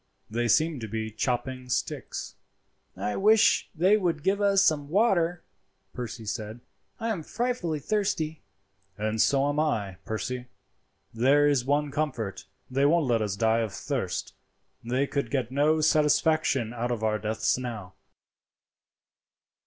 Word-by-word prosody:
They 120 Hz, +2 st, 0 dB
seem 155 Hz, +4 st, +2 dB
to 110 Hz, -, -5 dB
be 110 Hz, +1 st, -4 dB
chopping 125 Hz, +3 st, -2 dB
sticks." 125 Hz, -, -3 dB, 0.6 s
"I 105 Hz, -, -2 dB
wish 215 Hz, +2 st, +4 dB
they 185 Hz, +6 st, +4 dB
would 170 Hz, -7 st, -1 dB
give 200 Hz, +2 st, +1 dB
us 200 Hz, -1 st, +4 dB
some 145 Hz, -3 st, +1 dB
water," 180 Hz, -3 st, +2 dB, 0.5 s
Percy 120 Hz, -2 st, -6 dB
said. 110 Hz, +2 st, -5 dB, 0.4 s
"I 230 Hz, 0 st, -2 dB
am 205 Hz, -7 st, -2 dB
frightfully 220 Hz, -4 st, -2 dB
thirsty." 160 Hz, -2 st, -1 dB, 0.6 s
"And 110 Hz, +1 st, 0 dB
so 140 Hz, 0 st, +3 dB
am 145 Hz, +1 st, 0 dB
I, 105 Hz, -, -1 dB
Percy. 125 Hz, +3 st, -4 dB, 0.7 s
There 135 Hz, +6 st, +4 dB
is 140 Hz, -4 st, +2 dB
one 145 Hz, +1 st, +1 dB
comfort, 130 Hz, -11 st, -3 dB, 0.2 s
they 135 Hz, +2 st, 0 dB
won't 165 Hz, 0 st, +3 dB
let 120 Hz, -3 st, +1 dB
us 105 Hz, -2 st, -1 dB
die 115 Hz, +2 st, +2 dB
of 110 Hz, -3 st, -1 dB
thirst; -, -, -3 dB, 0.5 s
they 125 Hz, +4 st, 0 dB
could 140 Hz, 0 st, -2 dB
get 130 Hz, -4 st, -1 dB
no 150 Hz, +3 st, +2 dB
satisfaction 155 Hz, -5 st, +2 dB
out 120 Hz, 0 st, -2 dB
of 120 Hz, -3 st, -2 dB
our 110 Hz, -1 st, +1 dB
deaths 110 Hz, +4 st, 0 dB
now." 110 Hz, -7 st, -6 dB
135 Hz, 140 wpm, -27 LUFS, 115-160 Hz, 0.7 s, wish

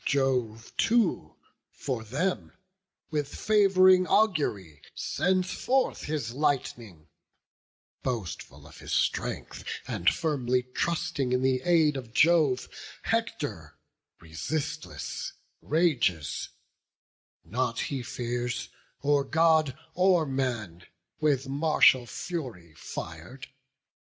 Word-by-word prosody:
Jove 125 Hz, -5 st, 0 dB
too 225 Hz, -, +1 dB, 0.3 s
for 125 Hz, -5 st, -4 dB
them, 150 Hz, -, -2 dB, 0.6 s
with 150 Hz, -2 st, -2 dB
fav'ring 185 Hz, -3 st, +5 dB
augury 140 Hz, -, +1 dB
Sends 185 Hz, 0 st, 0 dB
forth 265 Hz, +1 st, 0 dB
his 145 Hz, -7 st, -3 dB
lightning; 120 Hz, -, -2 dB, 0.9 s
boastful 115 Hz, -10 st, -5 dB
of -, -, -14 dB
his -, -, -8 dB
strength, -, -, -1 dB, 0.2 s
And 85 Hz, -, +2 dB
firmly 130 Hz, -5 st, 0 dB
trusting 140 Hz, 0 st, -1 dB
in 125 Hz, 0 st, +1 dB
the 130 Hz, -1 st, +2 dB
aid 160 Hz, -3 st, +3 dB
of 120 Hz, -4 st, -8 dB
Jove, 155 Hz, -4 st, +4 dB, 0.4 s
Hector, -, -, -2 dB, 0.4 s
resistless, 85 Hz, -, -4 dB, 0.3 s
rages; 140 Hz, -, 0 dB, 1.0 s
nought 115 Hz, +5 st, -1 dB
he 135 Hz, -3 st, -3 dB
fears 120 Hz, 0 st, -3 dB, 0.3 s
Or 145 Hz, 0 st, +3 dB
God 160 Hz, -1 st, +3 dB, 0.2 s
or 180 Hz, -2 st, +3 dB
man, 120 Hz, -, -3 dB, 0.4 s
with 140 Hz, -4 st, +1 dB
martial 140 Hz, -3 st, +4 dB
fury 120 Hz, -, -6 dB
fir'd. 85 Hz, -, -8 dB
135 Hz, 90 wpm, -28 LUFS, 120-160 Hz, 1.0 s, fav'ring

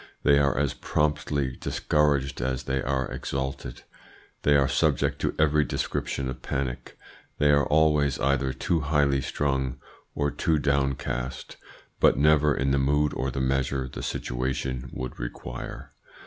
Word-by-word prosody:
They 70 Hz, -1 st, +5 dB
are 70 Hz, -2 st, +2 dB
as 70 Hz, -1 st, +1 dB
promptly 75 Hz, -3 st, -1 dB
discouraged 70 Hz, -3 st, 0 dB
as 65 Hz, +1 st, -1 dB
they 65 Hz, 0 st, -1 dB
are 65 Hz, 0 st, -1 dB
exalted, 65 Hz, -2 st, -4 dB, 0.6 s
they 75 Hz, -, +4 dB
are 70 Hz, -1 st, +4 dB
subject -, -, +1 dB
to -, -, -1 dB
every 75 Hz, -1 st, +3 dB
description 65 Hz, 0 st, -2 dB
of 65 Hz, -1 st, -6 dB
panic, 65 Hz, -2 st, -4 dB, 0.4 s
they 75 Hz, 0 st, +4 dB
are 70 Hz, 0 st, +3 dB
always 75 Hz, -2 st, +3 dB
either 65 Hz, -1 st, +1 dB
too 85 Hz, +6 st, 0 dB
highly 70 Hz, -2 st, +2 dB
strung 65 Hz, -2 st, -1 dB, 0.4 s
or 75 Hz, -1 st, 0 dB
too 80 Hz, -1 st, +1 dB
downcast, 70 Hz, -3 st, -2 dB, 0.4 s
but -, -, +5 dB
never 75 Hz, 0 st, +4 dB
in 70 Hz, +1 st, 0 dB
the 70 Hz, -, +2 dB
mood 75 Hz, +2 st, +2 dB
or 65 Hz, -, -2 dB
the 70 Hz, +1 st, -3 dB
measure 65 Hz, 0 st, 0 dB
the -, -, -7 dB
situation 65 Hz, 0 st, -3 dB
would 65 Hz, -1 st, -6 dB
require. -, -, -7 dB
70 Hz, 145 wpm, -26 LUFS, 65-75 Hz, 0.6 s, They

